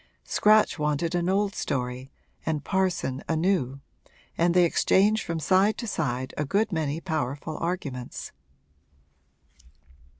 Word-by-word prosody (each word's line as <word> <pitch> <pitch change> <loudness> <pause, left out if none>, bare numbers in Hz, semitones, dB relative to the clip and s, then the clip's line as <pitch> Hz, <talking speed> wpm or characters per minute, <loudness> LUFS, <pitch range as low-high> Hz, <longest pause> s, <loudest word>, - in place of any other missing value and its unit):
Scratch 215 -4 +3
wanted 150 +3 0
an 175 0 0
old 200 +1 +1
story 125 0 -3 0.3
and 155 -3 -2
Parson 185 -9 -1
a 160 - +2
new, 155 -6 0 0.5
and 170 +1 +2
they 180 - +6
exchanged 205 +5 +3
from 165 -1 -3
side 190 +6 +3
to 235 - -4
side 130 - -2
a 150 - 0
good 205 +9 0
many 155 -2 -1
powerful 155 -3 -3
arguments. 145 -8 -4
165 Hz, 125 wpm, -26 LUFS, 140-190 Hz, 0.5 s, they